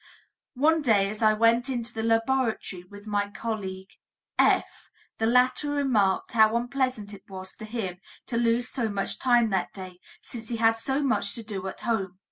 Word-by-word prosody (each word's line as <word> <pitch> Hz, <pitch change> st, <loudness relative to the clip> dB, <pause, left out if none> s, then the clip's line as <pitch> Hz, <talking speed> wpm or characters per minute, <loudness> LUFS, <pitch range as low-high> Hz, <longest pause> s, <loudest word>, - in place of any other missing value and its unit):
One 315 Hz, +5 st, +3 dB
day 205 Hz, -7 st, +3 dB
as 215 Hz, -, -7 dB
I 215 Hz, -1 st, +5 dB
went 230 Hz, +4 st, +3 dB
into 240 Hz, -2 st, -3 dB
the 220 Hz, -, -3 dB
laboratory 225 Hz, -4 st, 0 dB
with 205 Hz, 0 st, -12 dB
my 205 Hz, -1 st, -1 dB
colleague 200 Hz, -3 st, -5 dB, 0.5 s
F., -, -, +2 dB, 0.3 s
the 225 Hz, -, +2 dB
latter 250 Hz, +4 st, +3 dB
remarked 250 Hz, -10 st, +1 dB
how 220 Hz, -1 st, +4 dB
unpleasant 245 Hz, -3 st, -1 dB
it 200 Hz, -, -13 dB
was 190 Hz, -1 st, -8 dB
to 215 Hz, -, -8 dB
him 210 Hz, -5 st, -4 dB, 0.3 s
to 240 Hz, -, -4 dB
lose 235 Hz, +1 st, +2 dB
so 240 Hz, -5 st, -2 dB
much 200 Hz, -1 st, 0 dB
time 240 Hz, -3 st, +3 dB
that 190 Hz, -2 st, -1 dB
day, 185 Hz, -2 st, -9 dB, 0.2 s
since 225 Hz, -2 st, -9 dB
he 235 Hz, -, -2 dB
had 225 Hz, 0 st, +4 dB
so 265 Hz, +5 st, -1 dB
much 265 Hz, -2 st, +1 dB
to 230 Hz, -, -6 dB
do 195 Hz, -3 st, -5 dB
at 190 Hz, -, -7 dB
home. 195 Hz, -6 st, -2 dB
225 Hz, 180 wpm, -26 LUFS, 205-245 Hz, 0.5 s, I